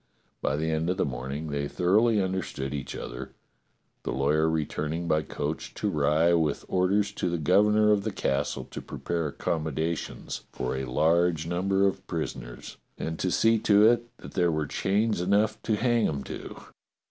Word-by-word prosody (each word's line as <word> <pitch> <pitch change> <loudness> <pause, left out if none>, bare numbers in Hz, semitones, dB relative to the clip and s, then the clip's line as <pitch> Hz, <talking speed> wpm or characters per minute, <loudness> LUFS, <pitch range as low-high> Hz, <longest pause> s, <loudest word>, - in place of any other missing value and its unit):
By - - 0
the 80 +2 -1
end 80 +2 0
of 90 - 0
the - - +2
morning 70 +4 -4
they 70 0 -1
thor 90 +5 +1
oughly 115 -2 +3
understood 95 -8 -2
each 70 -2 -5
other, - - -7 0.7
the - - -5
lawyer 75 +4 +2
returning 80 +1 -2
by 80 -1 +2
coach 75 - -4
to - - -1
Rye 75 +3 +3
with 80 -4 +1
orders 95 +3 +2
to 90 - -2
the 85 - -1
governor 105 +6 +4
of 100 -1 +2
the 110 - -1
castle 70 -5 -1
to - - -6
prepare 85 -2 -3
accommodation 80 +2 -2 0.3
for 65 - -3
a 65 0 -3
large 80 +5 +2
number 95 +3 +1
of 95 - -1
prisoners - - -5 0.2
and 80 0 -4
to 95 - 0
see 115 +4 +3
to 105 0 +5
it 120 0 +3
that - - -11
there 85 -2 +2
were 80 -1 -1
chains 105 +5 0
enough 100 +4 +2
to 110 - 0
hang 120 0 +2
'em 70 -3 -3
to. - - -8
85 Hz, 175 wpm, -27 LUFS, 75-100 Hz, 0.7 s, to